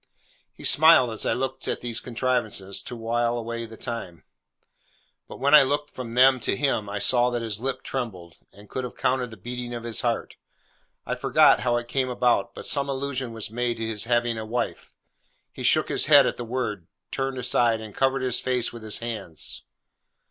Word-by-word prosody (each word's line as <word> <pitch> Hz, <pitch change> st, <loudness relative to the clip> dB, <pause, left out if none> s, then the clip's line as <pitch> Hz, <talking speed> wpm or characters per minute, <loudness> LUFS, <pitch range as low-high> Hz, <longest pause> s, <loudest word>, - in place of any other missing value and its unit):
He -, -, -13 dB
smiled 155 Hz, -6 st, +6 dB
as 110 Hz, -, -1 dB
I -, -, +2 dB
looked 130 Hz, +2 st, -3 dB
at -, -, -2 dB
these 120 Hz, -1 st, -1 dB
contrivances 120 Hz, -6 st, -2 dB
to 125 Hz, -, -7 dB
while 120 Hz, +1 st, 0 dB
away 115 Hz, 0 st, -4 dB
the 110 Hz, 0 st, -12 dB
time; 115 Hz, -9 st, -6 dB, 1.0 s
but -, -, -10 dB
when 140 Hz, +2 st, +2 dB
I 150 Hz, -, +11 dB
looked 145 Hz, +2 st, -1 dB
from 120 Hz, -2 st, -7 dB
them 130 Hz, +1 st, +6 dB
to 100 Hz, -, -1 dB
him, 110 Hz, -6 st, 0 dB
I 105 Hz, -, -3 dB
saw 120 Hz, +4 st, +3 dB
that 120 Hz, -1 st, -2 dB
his 110 Hz, -2 st, -2 dB
lip 135 Hz, +1 st, -2 dB
trembled, 95 Hz, -10 st, -5 dB, 0.2 s
and 105 Hz, +1 st, -15 dB
could 130 Hz, -, -4 dB
have 125 Hz, -, -7 dB
counted 125 Hz, -1 st, 0 dB
the 110 Hz, -, -11 dB
beating 120 Hz, +4 st, -6 dB
of 120 Hz, -, -6 dB
his 115 Hz, -2 st, -2 dB
heart. -, -, -2 dB, 0.7 s
I -, -, -2 dB
forget -, -, +4 dB
how 120 Hz, -1 st, +1 dB
it 120 Hz, 0 st, -4 dB
came 130 Hz, +1 st, 0 dB
about, 125 Hz, -4 st, +1 dB
but -, -, -7 dB
some 140 Hz, -1 st, +1 dB
allusion 135 Hz, -2 st, -3 dB
was 110 Hz, -2 st, -5 dB
made 120 Hz, 0 st, -1 dB
to 115 Hz, -, -3 dB
his 110 Hz, -1 st, -2 dB
having 120 Hz, -1 st, +1 dB
a -, -, -4 dB
wife. 115 Hz, +2 st, -3 dB, 0.6 s
He -, -, -10 dB
shook -, -, +3 dB
his -, -, +1 dB
head -, -, +8 dB
at -, -, 0 dB
the 120 Hz, -, -6 dB
word, 110 Hz, -7 st, -3 dB, 0.2 s
turned 135 Hz, -1 st, -2 dB
aside, 120 Hz, -2 st, +2 dB
and 110 Hz, -2 st, -9 dB
covered 135 Hz, 0 st, +1 dB
his 125 Hz, -1 st, 0 dB
face 125 Hz, -2 st, 0 dB
with 120 Hz, -, -9 dB
his 110 Hz, -1 st, -2 dB
hands. 110 Hz, -9 st, -3 dB
120 Hz, 200 wpm, -25 LUFS, 115-130 Hz, 1.0 s, I